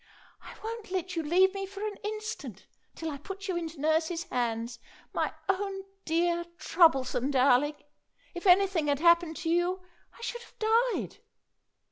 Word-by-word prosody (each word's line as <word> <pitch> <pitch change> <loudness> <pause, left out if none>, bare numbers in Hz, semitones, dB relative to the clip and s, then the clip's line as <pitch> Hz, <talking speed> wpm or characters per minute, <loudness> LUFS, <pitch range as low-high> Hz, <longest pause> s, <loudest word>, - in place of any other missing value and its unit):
"I - - -11
won't 450 -1 -5
let 365 -1 -3
you 330 - 0
leave 365 +5 +4
me 390 -1 -4
for 400 +2 -6
an 420 -2 -4
instant 425 - -5 0.3
till 325 -1 -4
I 280 - -6
put 390 +6 -7
you 375 - -1
into 330 -3 -4
nurse's 320 +3 +1
hands. 235 -2 -2 0.3
My - - 0 0.2
own 390 0 -1 0.2
dear, 340 +1 +1
troublesome 270 -8 +3
darling! 280 +2 +4 0.6
If 350 +2 -4
anything 370 -4 +5
had 285 -1 +2
happened 340 +1 +4
to 330 -1 -3
you 355 +2 +1 0.3
I - - -15
should 475 0 -4
have 475 - -17
died!" 455 +2 +1
345 Hz, 155 wpm, -29 LUFS, 300-390 Hz, 0.6 s, anything